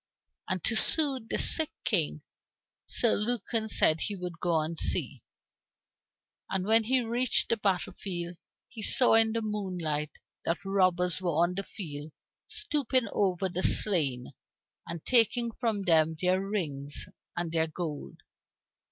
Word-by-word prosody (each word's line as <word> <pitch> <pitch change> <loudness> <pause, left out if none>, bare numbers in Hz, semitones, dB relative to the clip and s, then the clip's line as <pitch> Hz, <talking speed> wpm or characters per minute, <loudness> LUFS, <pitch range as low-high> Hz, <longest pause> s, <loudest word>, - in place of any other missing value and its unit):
And 185 -2 -2
to 225 - 0
soothe 265 -3 +1
the - - 0
sick 315 -2 +2
King, 160 -7 +1 0.6
Sir 235 - +2
Lucan 225 0 -1
said 160 -6 +3
he 205 - -2
would 180 -3 -7
go 160 -3 0
to 165 - -6
see. - - 0 1.3
And 190 -1 -2
when 225 +1 +3
he 255 +2 +2
reached 240 +2 +2
the 230 - +1
battle 195 -4 -1
field, 175 -3 -5 0.3
he 220 - -10
saw 250 +4 +3
in 225 0 +6
the 230 -1 -2
moonlight 180 -8 -2 0.3
that 175 +4 -2
robbers 185 -2 +2
were 180 - -1
on 175 +1 0
the 195 - -3
field 155 -7 -8 0.3
stooping 260 - -1
over 190 -2 0
the 180 0 -4
slain, 145 -15 +4 0.6
and 170 -2 -7
taking 235 0 +3
from 225 -5 -1
them 160 -2 +3
their 185 +2 +1
rings 150 -9 -4 0.3
and 175 -1 -2
their 160 -1 +1
gold. 155 -2 -6
190 Hz, 145 wpm, -29 LUFS, 165-225 Hz, 1.3 s, in